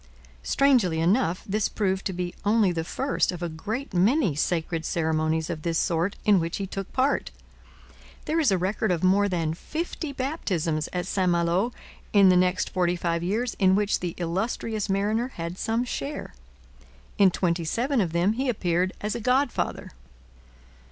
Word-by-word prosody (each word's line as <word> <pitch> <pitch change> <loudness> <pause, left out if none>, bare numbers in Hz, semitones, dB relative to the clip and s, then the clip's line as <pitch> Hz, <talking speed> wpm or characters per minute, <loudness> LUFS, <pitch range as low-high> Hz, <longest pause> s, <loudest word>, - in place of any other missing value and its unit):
Strangely 230 - +3
enough, 180 +1 +1
this 210 +2 0
proved 190 -2 -1
to - - -3
be 180 -1 -4
only 210 -2 +3
the 165 -2 -2
first 270 +9 0
of 175 -1 -6
a 170 - -2
great 215 - -5
many 200 - +3
sacred 165 +2 -1
ceremonies 160 -1 0
of 155 -2 -4
this 165 0 -1
sort 175 +3 0
in 205 -3 +5
which 165 0 -2
he 200 - -3
took 195 0 -6
part. 265 +2 +1 1.0
There 320 +2 0
is 300 -6 +3
a 190 - +3
record 195 +4 -1
of 175 -1 -1
more 200 +2 +4
than 165 -4 -1
fifty 315 - -5
baptisms 185 - -2
at 180 -1 -2
St 185 -1 0
Malo 175 +6 +1 0.4
in 200 -2 +7
the 180 - +5
next 180 +1 +2
forty 180 -1 +1
five 170 -1 -1
years 220 +7 -1
in 190 -2 +5
which 205 0 +1
the 175 -2 -4
illustrious 200 +4 -2
mariner 210 +5 +1
had 170 +2 -5
some 225 +2 0
share; 280 +4 -5 0.9
in 195 -2 +7
twenty 170 -1 0
seven 240 - 0
of 175 -4 -1
them 175 +5 +2
he 260 +3 -1
appeared 185 -4 0
as 210 0 -2
a 235 - -4
godfather. 255 +3 0
190 Hz, 170 wpm, -26 LUFS, 170-225 Hz, 1.0 s, in